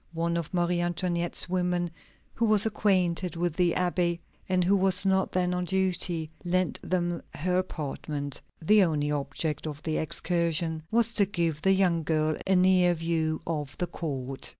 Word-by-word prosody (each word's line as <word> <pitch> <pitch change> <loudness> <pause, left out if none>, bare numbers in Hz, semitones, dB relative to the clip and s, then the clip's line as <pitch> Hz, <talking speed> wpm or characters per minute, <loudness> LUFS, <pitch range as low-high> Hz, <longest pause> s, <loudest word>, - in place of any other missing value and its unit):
One 170 +1 -1
of 170 -2 -3
Marie 175 -1 +1
Antoinette's 175 0 -1
women, 180 -1 -1 0.4
who 230 - 0
was 215 -1 +5
acquainted 185 -5 +1
with 175 -1 -1
the 175 0 +2
Abbé, 175 -1 0 0.3
and 185 -1 +2
who 190 +3 +3
was 190 0 +2
not 190 0 +2
then 180 -1 0
on 180 0 -1
duty, 180 -3 +1 0.2
lent 185 0 0
them 175 -2 -1
her 180 +4 +1
apartment. 145 -4 -5 0.2
The 205 +5 +5
only 150 -4 0
object 145 +2 -2
of 150 -1 -7
the 155 -1 -1
excursion 165 0 -1
was 230 0 +3
to 205 -3 +3
give 170 -6 -1
the 195 - +4
young 180 -4 +2
girl 155 0 0
a 190 - +4
near 180 -1 +4
view 160 -1 -1
of 150 -4 -4
the 180 - -1
court. 135 -6 -4
175 Hz, 165 wpm, -27 LUFS, 160-185 Hz, 0.4 s, was